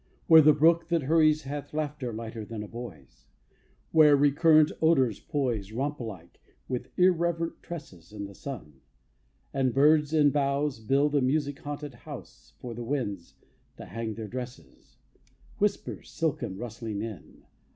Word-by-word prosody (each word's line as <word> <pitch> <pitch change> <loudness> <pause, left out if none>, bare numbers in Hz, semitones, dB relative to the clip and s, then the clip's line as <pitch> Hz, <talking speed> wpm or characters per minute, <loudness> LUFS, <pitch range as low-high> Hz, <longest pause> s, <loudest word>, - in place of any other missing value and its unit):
Where 160 -1 +9
the 155 0 +7
brook, 165 +3 +4
that 170 -3 +1
hurries, 155 +1 +3
hath 145 +2 -6
Laughter 150 -5 -3
lighter 110 0 -6
than 105 +1 -6
a - - -8
boy's; 105 - -10 0.6
Where 155 -2 +7
recurrent 155 +2 +5
odors 135 -9 +3
poise, 120 -8 -2
Romp 140 +6 -2
like, 100 -8 -9 0.3
with 125 -2 -4
irreverent 170 -2 +1
tresses, 105 - -9
In 105 -1 -6
the 100 - -10
sun; 85 - -9 0.7
and 130 -2 0
birds 150 +1 +4
and 150 -3 +4
boughs 140 -1 0
Build 140 +6 +1
a 145 - +3
music 145 +2 0
haunted 145 -1 -6
house 120 - -11
For 120 -2 -6
the 120 +1 -6
winds 115 -9 -3 0.4
to - - -9
hang 115 -2 -5
their 110 -1 -6
dresses, 125 +1 -9 0.6
Whisper 210 0 -1
silken, 155 - -3
rustling 110 -2 -5
in. 105 -9 -9
140 Hz, 145 wpm, -28 LUFS, 115-150 Hz, 0.7 s, Where